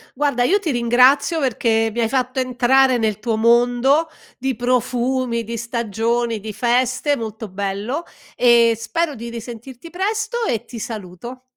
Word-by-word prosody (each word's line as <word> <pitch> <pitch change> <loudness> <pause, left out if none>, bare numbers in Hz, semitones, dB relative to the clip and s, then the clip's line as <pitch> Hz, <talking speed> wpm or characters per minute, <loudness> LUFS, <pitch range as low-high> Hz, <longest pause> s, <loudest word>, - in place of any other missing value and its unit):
Guarda, 280 -3 +1
io 395 +9 +3
ti 340 -6 -3
ringrazio 250 +6 +3
perché 225 -4 +1
mi 240 - -2
hai 225 - +1
fatto 255 0 -1
entrare 255 0 +3
nel 215 -3 0
tuo 225 0 -1
mondo 245 +7 +3 0.3
di 265 +1 -1
profumi, 245 -1 0
di 230 +2 -5
stagioni, 235 0 -2
di 215 +1 -6
feste, 255 +5 +1
molto 220 -2 -6
bello 200 - -3 0.3
e 235 -2 +5
spero 320 +7 -2
di 235 -1 -7
risentirti 240 +5 -9
presto 430 +6 -2
e 230 0 -1
ti 235 0 -9
saluto. 225 +2 -8
240 Hz, 145 wpm, -20 LUFS, 230-265 Hz, 0.3 s, e